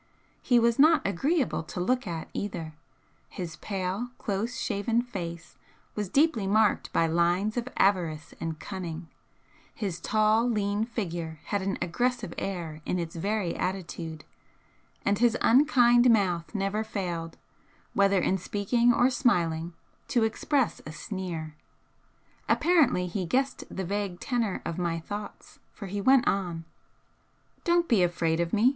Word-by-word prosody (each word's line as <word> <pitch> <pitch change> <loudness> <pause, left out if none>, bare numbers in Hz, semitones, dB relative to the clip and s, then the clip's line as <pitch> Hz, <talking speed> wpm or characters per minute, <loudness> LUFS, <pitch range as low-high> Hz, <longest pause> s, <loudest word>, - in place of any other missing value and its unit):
He 245 - +3
was 235 +1 +3
not 315 +2 +6
agreeable 265 - +1
to 160 - -7
look 250 +5 0
at 165 -2 -4
either; 170 -6 -4 0.6
his 165 -4 -6
pale, 195 +6 -3
close 225 +2 -3
shaven 230 +2 0
face 170 -8 -7 0.4
was 210 -3 -3
deeply 275 - +2
marked 210 +1 +2
by 165 - +3
lines 175 +6 +1
of 245 0 -2
avarice 170 -6 +1
and 160 -1 -4
cunning, 170 -4 -6 0.7
his 195 -6 -3
tall, 220 +2 +2
lean 205 -1 0
figure 170 -8 -4
had 205 - -2
an 195 +1 -2
aggressive 225 +1 -1
air 170 -5 -4
in 180 - -1
its 170 -1 -4
very 195 +1 -1
attitude, 165 -4 -4 0.8
and 200 0 +2
his 240 -1 +3
unkind 245 -2 +5
mouth 190 -4 +1
never 200 +2 0
failed, 175 -6 -4 0.6
whether 200 -1 +4
in 190 +1 +1
speaking 235 +6 +2
or 245 +2 +3
smiling, 170 - +1 0.3
to 240 -3 +2
express 250 +3 0
a 155 - -8
sneer. 170 -3 -5 1.0
Apparently 290 - +3
he 185 +2 -3
guessed 265 +8 0
the 190 - -4
vague 200 -1 -3
tenor 235 -6 -1
of 170 +1 -3
my 170 -2 0
thoughts, 205 +5 -8
for 205 - -9
he 200 +1 -3
went 260 +3 +5
on: 175 -4 -1 1.0
"Don't 345 -1 +2
be 225 -6 +4
afraid 170 -2 +1
of 170 0 0
me! 220 +4 +4
200 Hz, 140 wpm, -28 LUFS, 170-235 Hz, 1.0 s, not